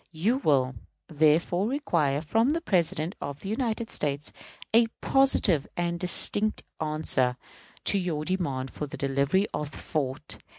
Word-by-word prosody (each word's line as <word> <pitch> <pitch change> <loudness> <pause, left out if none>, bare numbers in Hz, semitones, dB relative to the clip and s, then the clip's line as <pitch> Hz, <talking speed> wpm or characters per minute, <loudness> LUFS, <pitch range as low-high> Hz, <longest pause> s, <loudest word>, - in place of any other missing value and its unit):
You 205 +11 +1
will, 135 - +2 0.4
therefore, 160 +5 +2
require 165 - 0
from 225 - +2
the 320 +3 +1
President 175 - 0
of 140 0 -6
the 195 - -6
United 225 0 -2
States 145 0 -2 0.4
a 230 +1 +6
positive 235 - +3
and 170 0 -1
distinct 205 +4 +1 0.2
answer 150 -5 +1 0.5
to 200 - +3
your 160 -5 -2
demand 140 -8 -2
for 150 - -5
the - - -8
delivery 140 +8 +1
of 150 -1 -3
the - - -11
fort. 135 -5 -3
160 Hz, 140 wpm, -27 LUFS, 145-205 Hz, 0.5 s, a